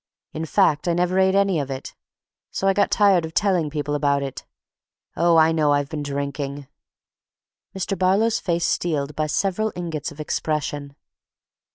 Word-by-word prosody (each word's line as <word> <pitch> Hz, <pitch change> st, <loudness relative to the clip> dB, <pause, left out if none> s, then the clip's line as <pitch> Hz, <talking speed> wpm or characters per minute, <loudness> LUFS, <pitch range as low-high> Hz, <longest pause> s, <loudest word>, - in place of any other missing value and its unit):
In 160 Hz, +1 st, -4 dB
fact, 150 Hz, +1 st, +2 dB
I 170 Hz, -, +2 dB
never 180 Hz, +2 st, +1 dB
ate 190 Hz, 0 st, +3 dB
any 195 Hz, -4 st, +2 dB
of 140 Hz, -2 st, -3 dB
it. 135 Hz, -1 st, -6 dB, 0.6 s
So 195 Hz, -, -2 dB
I 195 Hz, -, +4 dB
got 200 Hz, +1 st, +2 dB
tired 195 Hz, -5 st, +4 dB
of 160 Hz, 0 st, -7 dB
telling 185 Hz, -7 st, +2 dB
people 145 Hz, -1 st, -3 dB
about 140 Hz, -1 st, +1 dB
it—oh, 165 Hz, +4 st, -3 dB
I 160 Hz, 0 st, +5 dB
know 155 Hz, -3 st, +2 dB
I've 145 Hz, -1 st, 0 dB
been 155 Hz, -2 st, -4 dB
drinking—" 140 Hz, 0 st, -4 dB, 1.1 s
Mr. 195 Hz, +1 st, -2 dB
Barlow's 195 Hz, +5 st, +2 dB
face 170 Hz, -1 st, -1 dB
steeled 150 Hz, -4 st, -1 dB
by 155 Hz, 0 st, -1 dB
several 195 Hz, +7 st, 0 dB
ingots 165 Hz, -4 st, -4 dB
of 150 Hz, -, -14 dB
expression. 145 Hz, -2 st, -3 dB
160 Hz, 160 wpm, -23 LUFS, 145-185 Hz, 1.1 s, I